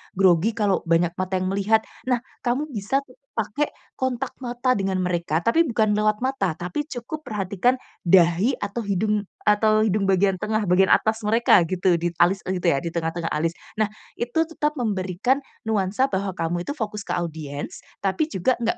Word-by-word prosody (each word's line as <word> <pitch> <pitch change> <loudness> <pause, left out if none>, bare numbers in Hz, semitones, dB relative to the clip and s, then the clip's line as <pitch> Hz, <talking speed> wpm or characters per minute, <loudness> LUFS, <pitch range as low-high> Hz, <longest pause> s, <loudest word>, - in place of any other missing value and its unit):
grogi 190 +3 +3
kalau 205 -4 +2
banyak 170 +1 +3
mata 185 0 -1
yang 185 0 0
melihat. 210 +3 +2 0.2
Nah, 250 -1 +1 0.2
kamu 275 +4 -1
bisa 230 +6 -1
ke 260 - -20 0.3
pakai 225 +7 0 0.3
kontak 260 -2 -2
mata 245 0 0
dengan 195 -3 -1
mereka, 170 -2 0
tapi 280 +9 +4
bukan 215 -3 +2
lewat 215 +2 +1
mata, 195 -12 -1
tapi 180 - -3
cukup 265 +5 -6
perhatikan 210 +3 0 0.2
dahi 180 +7 +4
atau 215 +4 -3
hidung 205 0 0 0.2
atau 215 +1 +4
hidung 210 -1 +1
bagian 190 0 +3
tengah 215 0 0
bagian 185 +1 +4
atas 220 +1 +3
mereka 220 -3 +5
gitu, 185 -1 +2
di 175 - +1
alis 190 +3 +4
e 185 0 -2
gitu 180 - -6
ya, 135 - 0
di 170 - -3
tengah-tengah 165 0 -2
alis. 165 +2 0 0.2
Nah, 215 -1 +2 0.3
itu 240 +7 0
tetap 300 -2 -2
memberikan 205 - 0 0.3
nuansa 210 +5 +1
bahwa 190 -1 -2
kamu 175 +1 -2
itu 285 - -3
fokus 210 -6 -4
ke - - -2
audiens, 155 -4 -4 0.2
tapi 200 +10 +1
juga 255 - 0
nggak 230 -1 0
205 Hz, 175 wpm, -24 LUFS, 180-235 Hz, 0.3 s, mereka